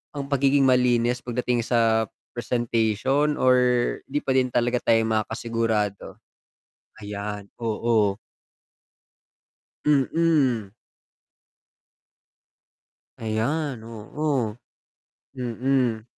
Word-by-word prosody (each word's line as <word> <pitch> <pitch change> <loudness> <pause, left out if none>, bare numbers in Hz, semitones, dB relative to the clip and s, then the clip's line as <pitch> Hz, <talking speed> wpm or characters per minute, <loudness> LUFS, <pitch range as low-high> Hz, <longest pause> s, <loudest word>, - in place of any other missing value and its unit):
ang 140 -1 -5
pagiging 140 0 +3
malinis 125 -2 +3
pagdating 120 -1 -2
sa 115 -2 +2 0.2
presentation 120 +4 0
or 130 -2 +4 0.5
di 145 +2 -2
pa - - -1
din 130 -1 +3
talaga 120 0 +1
tayo 115 -1 +3
makakasigurado? 110 -1 -1 0.8
Ayan, 105 0 -6 0.2
oo. 110 -3 +1 1.7
Mm. 140 -7 +2 2.5
Ayan, 115 +3 -2
oo, 115 +1 -3 0.8
mm. 125 -2 -1
120 Hz, 70 wpm, -24 LUFS, 110-135 Hz, 2.5 s, or